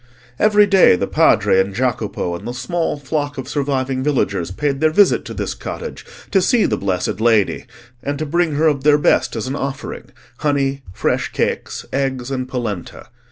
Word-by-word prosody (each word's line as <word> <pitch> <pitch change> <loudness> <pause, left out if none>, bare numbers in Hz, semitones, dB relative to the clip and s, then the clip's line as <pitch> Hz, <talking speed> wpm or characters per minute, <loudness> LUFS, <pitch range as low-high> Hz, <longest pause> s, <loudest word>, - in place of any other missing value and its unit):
Every 210 -1 +5
day 195 - +6
the - - -1
Padre 95 - +3
and 95 +1 0
Jacopo 110 -7 -1
and 95 +6 -8
the 120 - -5
small 155 +7 -2
flock 145 +1 -3
of 130 - -5
surviving 135 -2 -1
villagers 100 - 0
paid 140 +7 -2
their 155 - +4
visit 195 +5 +4
to - - -7
this - - -3
cottage 475 - -7 0.3
to 190 - +4
see 230 +4 +3
the - - +1
blessed 95 +1 -2
Lady, 110 -4 +2 0.3
and 145 0 -3
to 155 - -3
bring 165 0 0
her 155 +3 +2
of 145 -4 +2
their 150 0 +5
best 145 - +2
as 115 - -3
an 130 +2 -3
offering—honey, 135 0 -3
fresh - - -1
cakes, - - -2
eggs, 135 -1 -2
and 130 -1 -3
polenta. 110 -7 -5
135 Hz, 175 wpm, -19 LUFS, 120-150 Hz, 0.3 s, day